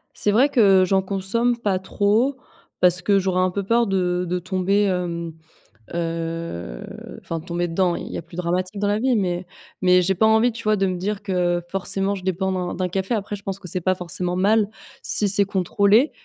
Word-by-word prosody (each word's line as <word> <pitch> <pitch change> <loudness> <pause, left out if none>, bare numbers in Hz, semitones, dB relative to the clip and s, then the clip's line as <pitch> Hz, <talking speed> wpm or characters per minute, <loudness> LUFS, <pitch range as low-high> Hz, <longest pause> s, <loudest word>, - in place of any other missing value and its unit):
C'est 205 - 0
vrai 250 +8 +4
que 200 -8 +5
j'en 190 +1 +2
consomme 200 +6 0
pas 200 -5 -1
trop 215 +8 +1 0.4
parce 180 0 +4
que 200 +2 +2
j'aurais 190 -1 0
un 185 - +2
peu 200 +2 -3
peur 230 +4 +2
de 180 -2 0
de 180 +1 -1
tomber, 185 +3 0
hem, 175 -3 -2 0.6
heu, 165 - -4 0.4
enfin 165 - -5
tomber 175 +1 -3
dedans. 175 +1 +1
Il - - -6
y - - -4
a - - -4
plus 170 +1 -15
dramatique 180 +3 -2
dans 205 - 0
la 205 +1 +1
vie, 255 +1 +1
mais 180 -3 -1 0.4
mais 180 -1 +5
j'ai 190 +2 0
pas 220 - +2
envie, 220 +2 +4
tu 230 0 -9
vois, 215 0 +2
de 195 -1 0
me 185 -1 -2
dire 200 +3 -3
que 180 -3 0
forcément 195 +1 -1
je 190 - -9
dépends 190 +1 -1
d'un 180 -1 -3
d'un 185 -1 -2
café. 190 +4 -2
Après, 205 -2 -3
je 200 - -17
pense 195 -1 -4
que 180 - -9
c'est 185 - -2
pas 185 +2 +1
forcément 180 0 -4
mal 205 +3 +3 0.3
si 205 - +5
c'est 200 +1 +7
contrôlé 200 - +2
190 Hz, 210 wpm, -22 LUFS, 180-205 Hz, 0.6 s, c'est